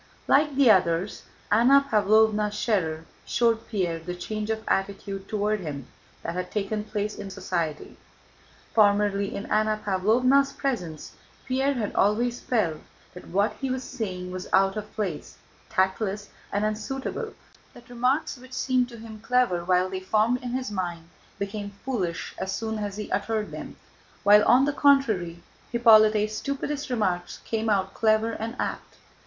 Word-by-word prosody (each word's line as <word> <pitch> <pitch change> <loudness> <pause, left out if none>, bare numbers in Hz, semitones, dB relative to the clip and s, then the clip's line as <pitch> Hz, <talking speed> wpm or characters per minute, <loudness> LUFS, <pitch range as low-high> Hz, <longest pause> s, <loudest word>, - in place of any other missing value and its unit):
Like 295 0 +3
the 265 -4 +6
others, 180 0 +1 0.3
Anna 260 +6 +5
Pávlovna 215 -1 +3
Schérer 185 -7 -1 0.2
showed 230 -1 +1
Pierre 180 -6 -1
the 180 +2 -6
change 215 +4 -4
of 220 0 -2
attitude 195 0 -2
toward 210 0 0
him 145 -7 -6 0.4
that - - -3
had 180 0 -4
taken 210 0 -2
place 210 -1 -3
in 200 -1 -6
society. 165 -5 -4 0.8
Formerly 205 -2 +3
in 200 - -5
Anna 215 0 +1
Pávlovna's 245 +8 +3
presence, 180 - -3 0.3
Pierre 270 +2 +1
had 220 -5 -2
always 235 +4 +1
felt 180 -11 0 0.3
that 180 - -11
what 200 +5 +1
he 270 - -1
was 260 0 -2
saying 185 -8 -5
was 185 0 -6
out 195 +1 +3
of 215 0 -6
place, 190 -8 -4 0.3
tactless 200 0 0 0.2
and 205 +1 0
unsuitable, 265 - -4 0.4
that 240 -1 -15
remarks 250 +3 0
which 255 +1 -14
seemed 255 -2 +1
to 235 - -10
him 220 -1 -10
clever 225 -6 +1
while 180 +1 +2
they 190 0 -4
formed 215 +6 +1
in 250 - -5
his 255 -2 -3
mind 175 -4 -4 0.3
became 200 0 -5
foolish 190 -11 -2
as 190 - -3
soon 220 +2 -3
as 205 -1 -4
he 210 - -6
uttered 215 +1 -1
them, - - -8 0.5
while 210 +1 +7
on 260 +2 +5
the 290 - 0
contrary 225 -12 +2 0.3
Hippolyte's 215 -2 +5
stupidest 280 +3 -3
remarks 185 -7 -1
came 225 0 -1
out 195 -2 +1
clever 220 0 +2
and 225 +2 -5
apt. - - -4
215 Hz, 150 wpm, -26 LUFS, 190-240 Hz, 0.8 s, while